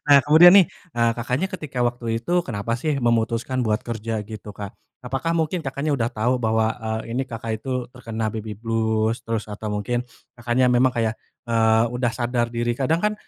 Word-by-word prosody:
Nah, 140 Hz, -, +9 dB
kemudian 160 Hz, +4 st, +8 dB
nih, 195 Hz, -, +8 dB, 0.3 s
eee, 115 Hz, 0 st, +3 dB
Kakaknya 125 Hz, +8 st, -1 dB
ketika 150 Hz, -8 st, -6 dB
waktu 120 Hz, 0 st, -8 dB, 0.2 s
itu -, -, -6 dB, 0.2 s
kenapa 115 Hz, -1 st, -3 dB
sih 155 Hz, +1 st, 0 dB
memutuskan 115 Hz, +2 st, +1 dB
buat 105 Hz, 0 st, +1 dB
kerja 115 Hz, -1 st, -4 dB
gitu, 105 Hz, 0 st, -9 dB
Kak? 100 Hz, -1 st, -6 dB, 0.3 s
Apakah 135 Hz, +6 st, -2 dB
mungkin 165 Hz, +2 st, 0 dB
Kakaknya 140 Hz, +3 st, -2 dB
udah 115 Hz, -1 st, 0 dB
tahu, 120 Hz, +3 st, 0 dB
bahwa, 110 Hz, 0 st, +2 dB, 0.2 s
eee, 110 Hz, +1 st, -3 dB
ini 130 Hz, +2 st, 0 dB
Kakak 115 Hz, -1 st, -4 dB
itu -, -, -10 dB, 0.2 s
terkena 110 Hz, -3 st, -4 dB
baby 110 Hz, -1 st, -5 dB
blues? 110 Hz, +1 st, 0 dB
Terus, 115 Hz, -2 st, -2 dB
atau 105 Hz, +1 st, -5 dB
mungkin, 105 Hz, +4 st, -1 dB, 0.4 s
Kakaknya 125 Hz, +1 st, +2 dB
memang, 125 Hz, +1 st, +4 dB
kayak, 110 Hz, -1 st, +1 dB, 0.3 s
eee, 115 Hz, -1 st, +3 dB
udah 125 Hz, 0 st, 0 dB
sadar 120 Hz, -1 st, 0 dB
diri. 120 Hz, 0 st, -1 dB
Kadang 140 Hz, +7 st, 0 dB
kan, 210 Hz, -, +3 dB
115 Hz, 180 wpm, -23 LUFS, 110-130 Hz, 0.4 s, Nah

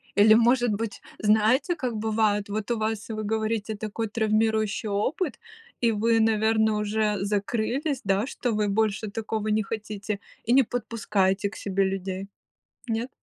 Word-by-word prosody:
Или, 210 Hz, +1 st, +7 dB
может 240 Hz, +1 st, +4 dB
быть, 210 Hz, +1 st, -3 dB, 0.2 s
знаете, 220 Hz, -, +3 dB
как 250 Hz, -7 st, -3 dB
бывает? 215 Hz, -1 st, +1 dB
Вот 215 Hz, +2 st, -3 dB
у 235 Hz, -, +1 dB
вас, 220 Hz, 0 st, -2 dB
вы 215 Hz, -1 st, -3 dB
говорите, 220 Hz, 0 st, -1 dB
такой 215 Hz, +2 st, -4 dB
травмирующий 220 Hz, 0 st, +1 dB
опыт, 250 Hz, -, -1 dB, 0.4 s
и 235 Hz, -, +3 dB
вы, 225 Hz, +2 st, +2 dB
наверно, 220 Hz, 0 st, +2 dB
уже 210 Hz, 0 st, 0 dB
закрылись, 225 Hz, +8 st, -1 dB
да, 195 Hz, +3 st, +2 dB
что 245 Hz, -4 st, -2 dB
вы 210 Hz, -1 st, +1 dB
больше 215 Hz, +1 st, 0 dB
такого 220 Hz, 0 st, -3 dB
не 215 Hz, +1 st, +2 dB
хотите 210 Hz, -1 st, -4 dB, 0.3 s
и 235 Hz, -, +2 dB
не 270 Hz, +1 st, +6 dB
подпускаете 205 Hz, -4 st, 0 dB
к -, -, -13 dB
себе 195 Hz, 0 st, 0 dB
людей. 190 Hz, 0 st, -3 dB, 0.6 s
Нет? 230 Hz, +2 st, -2 dB
215 Hz, 150 wpm, -26 LUFS, 205-225 Hz, 0.6 s, Или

